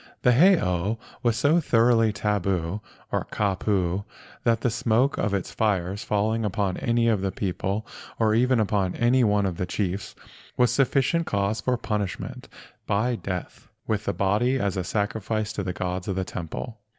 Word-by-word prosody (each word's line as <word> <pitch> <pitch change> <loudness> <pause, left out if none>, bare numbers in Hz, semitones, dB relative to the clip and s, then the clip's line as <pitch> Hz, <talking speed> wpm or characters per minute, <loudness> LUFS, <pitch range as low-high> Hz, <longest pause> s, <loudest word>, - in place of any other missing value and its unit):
The 125 - +6
heiau 115 - +3 0.2
was 120 -2 +1
so 145 +7 +4
thoroughly 115 -5 +3
"tabu," 100 -3 -1 0.3
or - - -1
"kapu," 95 -2 0 0.4
that 115 -1 +2
the 125 - +1
smoke 120 +4 +1
of 100 - 0
its 100 -2 -2
fires 100 -1 0
falling 110 +2 0
upon 100 -3 -1
any 115 0 +1
of 110 -4 +2
the 95 -1 -1
people 95 +3 -2 0.3
or 110 -1 +2
even 125 +2 +3
upon 100 -3 +1
any 120 +2 +3
one 105 -2 +3
of 90 -3 -2
the 90 - -2
chiefs 95 0 -3 0.4
was 125 -1 +4
sufficient 140 +5 +2
cause 100 +2 0
for 125 -1 +1
punishment 105 -4 -4 0.4
by 110 +5 +1
death, 90 -5 -6 0.2
with 110 -1 -1
the - - +1
body 105 +7 +1
as 100 -6 -1
a 95 - -1
sacrifice 110 +2 -2
to - - -3
the 90 -1 -2
gods 90 0 -3
of 95 - -1
the 95 0 -1
temple. 100 +8 -6
105 Hz, 165 wpm, -25 LUFS, 95-115 Hz, 0.4 s, The